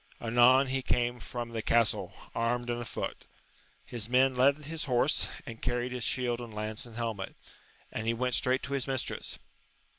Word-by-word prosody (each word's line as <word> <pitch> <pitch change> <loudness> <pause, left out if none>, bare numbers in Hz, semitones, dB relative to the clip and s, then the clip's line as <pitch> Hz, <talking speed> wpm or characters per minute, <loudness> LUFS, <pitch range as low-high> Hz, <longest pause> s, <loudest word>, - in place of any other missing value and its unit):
Anon 120 +3 +6
he 135 0 -1
came 120 -1 0
from 120 -1 -5
the 115 -1 -3
castle, 105 -5 +2 0.2
armed 120 +1 0
and 120 0 -2
afoot; 120 - -5 0.6
his 115 -2 -4
men 130 +1 +4
led 140 +4 +3
his 160 +1 -3
horse, 125 -3 +2 0.2
and 115 -1 -8
carried 120 0 -1
his 125 -1 -3
shield 120 -2 0
and 120 -2 -7
lance 110 +2 -3
and 115 - -13
helmet, 115 -5 -3 0.6
and 110 0 -3
he 115 - +3
went 125 +1 0
straight 130 +2 +2
to 140 - -4
his 135 -1 0
mistress. 130 -2 -2
120 Hz, 175 wpm, -30 LUFS, 115-130 Hz, 0.6 s, Anon